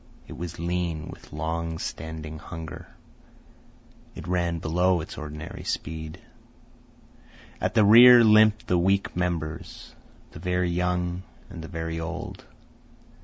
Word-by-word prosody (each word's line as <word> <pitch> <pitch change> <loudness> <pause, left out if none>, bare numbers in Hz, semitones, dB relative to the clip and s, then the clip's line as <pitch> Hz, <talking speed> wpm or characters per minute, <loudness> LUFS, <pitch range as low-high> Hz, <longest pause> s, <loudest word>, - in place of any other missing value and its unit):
It - - -9
was 85 -1 -6
lean 85 -2 -2
with - - -12
long 80 +1 -3
standing 80 -1 -6
hunger. 80 -2 -8 1.3
It - - -8
ran 85 -1 0
below 90 +3 +1
its 80 - -7
ordinary 75 +1 -7
speed. 80 -1 -4 1.4
At - - -1
the 110 -2 +5
rear 120 +3 +9
limped 110 +1 +5
the 90 -6 +2
weak 95 +3 +1
members, 85 -3 -4 0.4
the - - -10
very 90 -1 0
young 90 0 -1 0.3
and 85 -3 -8
the - - -7
very 80 -1 -4
old. 80 -1 -6
85 Hz, 120 wpm, -26 LUFS, 80-90 Hz, 1.4 s, rear